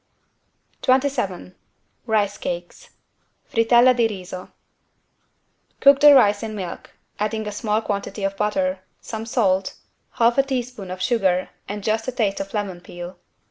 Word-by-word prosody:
27 255 -9 0 0.5
RICE 205 -2 +1
CAKES 175 - -6 0.6
(Frittelle 240 +2 +4
di 235 -2 +3
riso) 185 -3 -8 1.3
Cook 280 0 +6
the 295 -1 +9
rice 205 -5 +5
in 220 -1 -5
milk, 185 -4 -7 0.3
adding 215 +1 -1
a - - -3
small 215 +1 -1
quantity 200 0 -4
of 195 0 -1
butter, 195 -2 0 0.2
some 220 0 -6
salt, 195 -5 +1 0.4
half 235 +2 +3
a - - +8
teaspoon 250 -7 -4
of 185 0 -5
sugar 190 -5 +1 0.2
and 205 0 -5
just 220 +2 0
a - - 0
taste 210 -5 -1
of 195 0 -5
lemon 195 -4 -3
peel. 175 +1 -9
210 Hz, 140 wpm, -22 LUFS, 190-235 Hz, 1.3 s, the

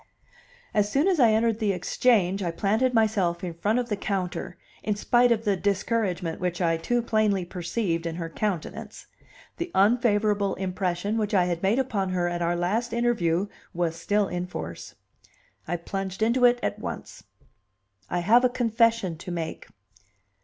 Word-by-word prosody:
As 205 -1 +1
soon 285 - +2
as 370 -5 +2
I 240 -3 +6
entered 225 0 +2
the 210 -3 +1
Exchange 195 +1 +2
I 175 - -1
planted 215 +9 +1
myself 205 -6 +1
in 175 -2 -3
front 205 +7 0
of 245 -1 -1
the 210 - 0
counter, 185 -3 -3 0.2
in 210 - -1
spite 240 +4 +3
of 225 -1 +1
the 205 -2 +2
discouragement 190 -3 -1
which 180 -1 -1
I 165 -2 +2
too 240 +8 0
plainly 215 -5 +1
perceived 175 -1 -2
in 165 - -4
her 165 -1 -4
countenance; 180 0 -4 0.5
the 345 +1 -3
unfavorable 205 -2 +3
impression 185 +2 -2
which 210 -1 -1
I 180 -2 +4
had 175 -1 -2
made 195 +5 +2
upon 215 -8 0
her 175 -1 +1
at 175 0 -3
our 170 0 +1
last 215 +7 -1
interview 205 -7 +1 0.3
was 170 -2 0
still 205 +5 +1
in 180 0 -3
force. 85 - -7 0.7
I 175 +2 -1
plunged 190 +3 -4
into 245 +3 +3
it 245 0 +5
at - - -2
once. - - -7 0.9
"I 175 - -1
have 230 +8 +5
a 255 - +4
confession 230 -7 +1
to 180 - -8
make." 165 -2 -5
200 Hz, 165 wpm, -26 LUFS, 175-225 Hz, 0.9 s, I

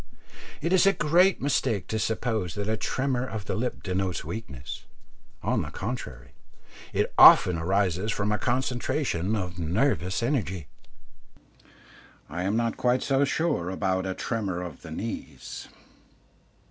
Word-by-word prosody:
It 170 +4 0
is 190 +1 +5
a 195 - +6
great 175 +3 +3
mistake 125 - +1
to 110 - -1
suppose 110 -4 -1
that 100 0 -3
a 110 - +1
tremor 130 +2 -1
of 110 -5 -5
the - - -2
lip 125 +3 -3
denotes 95 -1 -2
weakness; 70 - -7 0.6
on - - +1
the - - -5
contrary, 100 - -6 0.6
it - - 0
often 90 - +9
arises 95 +3 +1
from 105 0 -1
a 105 - 0
concentration 120 - 0
of 90 -3 -4
nervous 95 - 0
energy. 95 - -1 1.7
I 85 +3 -3
am 100 +3 +1
not 115 -1 0
quite 125 0 +2
so 135 0 +2
sure 140 - 0
about 95 0 -1
a 95 - -3
tremor 100 -6 -2
of 85 -6 -8
the - - -10
knees. 110 +8 -6
105 Hz, 140 wpm, -27 LUFS, 90-125 Hz, 1.7 s, often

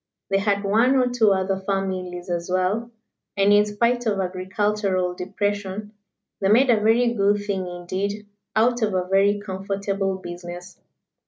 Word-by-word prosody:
They 195 - +3
had 200 0 0
one 225 +7 +3
or 250 -1 +3
two 230 -4 +3
other 190 0 0
families 185 -2 -3
as 175 0 -3
well, 190 +6 0 0.5
and 200 +1 +4
in 205 0 +5
spite 235 +3 0
of 205 -2 0
agricultural 185 0 -1
depression, 205 +2 -3 0.5
they 195 - +1
made 245 +5 +5
a 225 - +3
very 235 +2 +3
good 205 -1 +1
thing 190 -3 -2
indeed 190 +4 -4 0.3
out 240 +2 +2
of 210 -3 +1
a 180 -1 0
very 200 +2 +3
comfortable 195 0 -3
business. 175 0 -9
200 Hz, 150 wpm, -23 LUFS, 185-210 Hz, 0.5 s, in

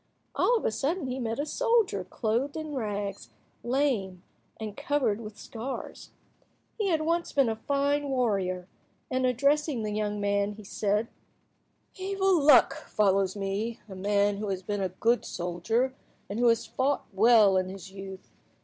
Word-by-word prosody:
All 485 - +3
of - - -4
a - - +2
sudden 305 - -1
he 255 0 -3
met 230 0 -2
a 290 - 0
soldier 465 +4 +1
clothed 245 +7 -1
in 310 -1 -5
rags, 205 -5 -3 0.3
lame, 240 -9 0 0.4
and 215 -2 -5
covered 260 -7 0
with 215 -2 -9
scars. 240 +4 -7 0.7
He 420 - +1
had 320 -3 +2
once 335 +2 0
been 275 -3 +3
a 220 - -1
fine 285 +4 0
warrior, 195 -8 0 0.4
and, 255 0 +2
addressing 280 0 +1
the 210 - -2
young 210 -1 -1
man, 200 0 +1
he 215 +1 -12
said— 210 +2 0 0.9
"Evil 385 -2 +1
luck 290 +1 +7
follows 195 -2 +2
me, 205 +3 -3
a 200 - -9
man 200 +1 +1
who 210 0 -3
has 190 -1 -3
been 205 +1 -2
a 190 - 0
good 230 +6 +1
soldier, 200 +9 -1 0.3
and 205 +3 -4
who 245 - +4
has 230 0 +3
fought 270 +2 0
well 215 -1 +6
in 185 0 +1
his 190 0 -9
youth. 195 -1 -9
225 Hz, 160 wpm, -28 LUFS, 200-280 Hz, 0.9 s, luck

